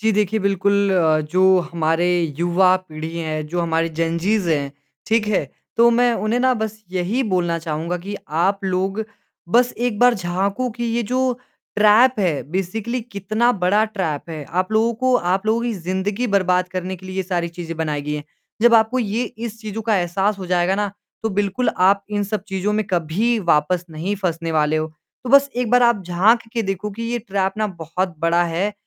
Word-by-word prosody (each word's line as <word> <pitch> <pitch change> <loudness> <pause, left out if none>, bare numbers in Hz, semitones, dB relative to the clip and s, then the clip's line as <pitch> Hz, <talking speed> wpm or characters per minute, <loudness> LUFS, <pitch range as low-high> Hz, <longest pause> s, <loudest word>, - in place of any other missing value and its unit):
जी, 220 +1 +2
देखिए 210 +1 +1
बिल्कुल 200 +1 +2
अ, 160 -4 +3
जो 175 +5 0 0.3
हमारी 170 +1 +1
युवा 180 +2 +4
पीढ़ी 160 -2 -7
है, 155 -2 -3
जो 175 +3 -3
हमारे 165 0 0
जेनजीज 170 +4 0
हैं, 140 -3 0 0.3
ठीक 220 -1 +2
है? 205 - +1 0.3
तो 235 +1 +6
मैं 240 +1 +3
उन्हें 235 +3 +1
ना 255 0 +3
बस 215 0 -5
यही 190 +8 0
बोलना 175 -2 +1
चाहूँगा 165 +2 -3
कि 200 +4 -6 0.2
आप 195 +3 +1
लोग 190 +3 -1 0.5
बस 245 +4 +3
एक 240 -3 -1
बार 245 0 +5
झाँको 195 +6 -1
कि 240 +1 -5
ये 235 +1 0
जो 255 0 +2 0.4
ट्रैप 215 +5 +6
है 165 -7 0
बेसिकली 215 +7 -2
कितना 215 +5 +1
बड़ा 205 +4 +3
ट्रैप 175 -8 -4
है। 155 -2 -6 0.2
आप 185 +3 -4
लोगों 225 +2 +3
को 255 0 +3 0.2
आप 190 +3 -1
लोगों 225 +2 +2
की 240 - -1
ज़िंदगी 190 +6 -2
बर्बाद 185 -3 +2
करने 185 0 -4
के 185 +1 -13
लिए 185 - -7
ये 190 - 0
सारी 175 -2 -2
चीज़ें 170 -1 -7
बनाई 150 -3 -2
गई 150 +1 -4
हैं, 150 -1 -5 0.4
जब 240 0 +6
आपको 225 +3 +4
ये 225 +1 -1
इस 225 -1 -7
चीज़ों 220 0 -5
का 215 -1 +2
एहसास 190 +3 0
हो 190 - -6
जाएगा 180 +1 +2
ना, 205 0 -1 0.3
तो 225 - 0
बिल्कुल 205 +4 0
आप 195 +2 +3
इन 205 -1 0
सब 205 0 -3
चीज़ों 195 +2 -1
में 215 0 0
कभी 190 +7 0
वापस 165 +4 +1
नहीं 165 +6 -3
फँसने 165 -2 -2
वाले 155 0 +2
हो। 155 - -1 0.4
तो 245 - -4
बस 280 +1 +6
1 245 -3 -1
बार 245 0 +5
आप 235 -4 +3
झाँक 195 +7 +4
के 230 - 0
देखो 195 +1 -3
कि 225 +4 -7
ये 240 +1 -2
ट्रैप 195 -3 -1
ना 215 - +1
बहुत 180 0 -4
बड़ा 165 +2 +2
है, 175 +5 -1
195 Hz, 195 wpm, -21 LUFS, 175-220 Hz, 0.5 s, तो